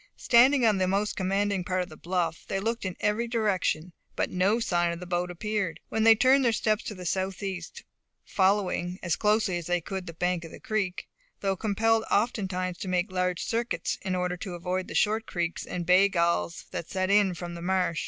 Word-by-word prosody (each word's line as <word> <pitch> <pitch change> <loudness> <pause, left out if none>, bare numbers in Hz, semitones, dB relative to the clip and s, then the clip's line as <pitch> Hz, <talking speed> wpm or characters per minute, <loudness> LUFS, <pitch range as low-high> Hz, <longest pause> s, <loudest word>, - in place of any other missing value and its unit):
Standing 255 +2 +5
on 210 -3 +3
the 185 - +2
most 200 +3 0
commanding 195 0 0
part 185 0 -1
of 180 - -10
the 155 - -11
bluff, 170 -1 -2
they 195 -2 -1
looked 225 +2 -2
in 185 -2 -4
every 215 +3 +1
direction, 190 -7 0 0.2
but - - -1
no 195 +5 +2
sign 175 -6 +1
of 170 - -5
the 180 - -7
boat 175 0 -1
appeared. 200 0 -2
Then 220 - 0
they 225 0 +8
turned 260 +4 +4
their 240 - +4
steps 215 0 +1
to 210 - -5
the 180 -1 -9
southeast, 190 -1 -3 0.4
following, 190 -2 +1
as 175 -3 +1
closely 210 -4 +1
as 165 - -8
they 175 0 +1
could, 185 +2 -6
the 165 - -6
bank 180 0 -1
of 165 - -8
the - - -11
creek, 215 -7 -2 0.3
though 195 -1 0
compelled 220 +2 +1
oftentimes 185 -5 0
to - - -5
make 185 +2 0
large 180 -1 -1
circuits 235 +1 -2
in 190 -1 -2
order 180 0 -1
to 180 0 -6
avoid 180 +2 -3
the - - -7
short 220 +1 +1
creeks 175 -1 -3
and 175 -1 -4
bay 185 +3 +5
galls 170 -2 0
that 170 - -5
set 185 0 -1
in 200 -3 +4
from 175 +1 -6
the 170 - -7
marsh. 180 -2 0
185 Hz, 210 wpm, -27 LUFS, 180-210 Hz, 0.4 s, they